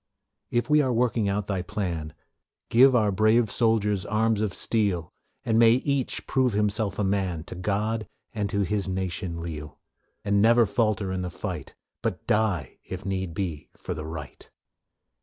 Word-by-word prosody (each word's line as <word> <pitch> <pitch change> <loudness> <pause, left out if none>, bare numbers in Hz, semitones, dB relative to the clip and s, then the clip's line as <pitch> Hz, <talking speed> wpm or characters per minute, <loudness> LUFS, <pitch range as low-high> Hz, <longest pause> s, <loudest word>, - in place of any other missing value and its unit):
If 120 0 0
we 150 0 +5
are 130 -3 +1
working 115 -3 +1
out 100 0 -1
Thy 95 -3 -2
plan, 90 -6 -4 0.5
Give 130 +2 +6
our 105 -4 +3
brave 110 +2 +3
soldiers 105 -4 +2
arms 110 +3 +1
of 105 -3 0
steel, 100 -7 -1 0.3
And 115 -1 +3
may 115 -1 +7
each 135 +1 -1
prove 130 -4 +1
himself 105 -1 0
a 105 - 0
man 95 -4 0
To - - -9
God 105 +4 -1 0.3
and 105 -3 -2
to 100 0 0
his 100 +1 -1
nation 90 -2 -3
leal, 75 -3 -7 0.5
And 100 0 +3
never 115 +2 +6
falter 105 -2 0
in 95 0 -2
the 90 - -3
fight, - - -6 0.3
But - - -3
die, 100 - 0
if 95 +1 -7
need 95 -4 -3
be, 85 -6 -4
for - - -5
the 80 -2 -6
right. 80 -3 -8
100 Hz, 165 wpm, -26 LUFS, 90-110 Hz, 0.5 s, may